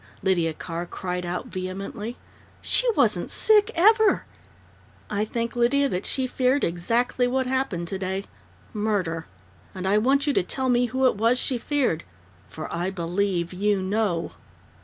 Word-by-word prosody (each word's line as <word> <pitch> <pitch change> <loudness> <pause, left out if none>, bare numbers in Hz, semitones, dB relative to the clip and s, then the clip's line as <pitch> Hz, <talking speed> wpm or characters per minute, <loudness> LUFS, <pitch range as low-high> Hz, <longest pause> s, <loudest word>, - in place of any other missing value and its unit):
Lydia 175 -4 +2
Carr 170 +2 -6
cried 180 -1 -4
out 175 +1 -3
vehemently. 195 +5 -5 0.4
"She - - +2
wasn't - - +2
sick, 430 -1 +4
ever 430 +4 +4 0.4
" - - -29
"I 210 0 0
think, 230 +2 -3
Lydia, 265 +4 +3
that 180 -2 -2
she 265 - 0
feared 255 +2 +1
exactly 230 +9 +1
what 260 +1 0
happened 255 -10 -1
today 190 +1 -3 0.5
murder! 200 -7 -1 0.5
And 185 0 -3
I 205 +2 +4
want 275 +5 +2
you 290 - +1
to - - +3
tell 260 +8 -2
me 245 0 +3
who 260 +3 0
it 250 - +3
was 230 +4 +3
she 250 -1 +1
feared. 260 - 0 0.5
_For 155 - -6
I 175 +2 -1
believe 180 0 -1
you 205 +2 +1
know! 190 -4 0
210 Hz, 155 wpm, -25 LUFS, 180-255 Hz, 0.5 s, sick